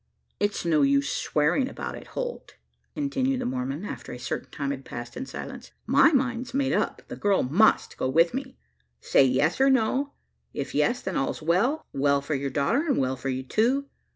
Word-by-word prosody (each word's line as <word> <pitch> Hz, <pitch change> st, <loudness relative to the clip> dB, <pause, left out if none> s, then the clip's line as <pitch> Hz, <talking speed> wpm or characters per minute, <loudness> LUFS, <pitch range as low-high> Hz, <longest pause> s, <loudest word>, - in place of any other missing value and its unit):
"It's 205 Hz, -3 st, -1 dB
no 160 Hz, -3 st, +3 dB
use 140 Hz, 0 st, +3 dB
swearing 165 Hz, -, +1 dB
about -, -, -6 dB
it, -, -, -10 dB
Holt," -, -, -5 dB, 0.4 s
continued 270 Hz, -3 st, 0 dB
the -, -, -3 dB
Mormon, 130 Hz, +7 st, -3 dB
after -, -, -7 dB
a -, -, -6 dB
certain 125 Hz, -, -4 dB
time 140 Hz, -1 st, -3 dB
had 135 Hz, -1 st, -5 dB
passed 120 Hz, -2 st, -8 dB
in 265 Hz, +1 st, -5 dB
silence. -, -, -8 dB
"My 280 Hz, +2 st, +5 dB
mind's 255 Hz, -3 st, 0 dB
made 275 Hz, -1 st, +1 dB
up -, -, -1 dB
the -, -, -6 dB
girl 200 Hz, -2 st, +2 dB
must 175 Hz, +13 st, +3 dB
go 130 Hz, -, -1 dB
with 165 Hz, +5 st, +4 dB
me. 265 Hz, 0 st, -5 dB, 0.4 s
Say -, -, +4 dB
yes 135 Hz, -, +2 dB
or 270 Hz, -, +6 dB
no. 265 Hz, +3 st, +1 dB, 0.4 s
If -, -, -4 dB
yes, 245 Hz, -, +1 dB
then 190 Hz, -, -2 dB
all's 135 Hz, -, -2 dB
well 200 Hz, -, +1 dB
well 140 Hz, +1 st, +2 dB
for 140 Hz, +2 st, -4 dB
your 140 Hz, 0 st, -1 dB
daughter, 140 Hz, -, +1 dB
and 280 Hz, -, +2 dB
well 130 Hz, 0 st, +1 dB
for 135 Hz, +1 st, -4 dB
you 130 Hz, 0 st, -2 dB
too. 255 Hz, -, +1 dB
180 Hz, 195 wpm, -26 LUFS, -, 0.4 s, or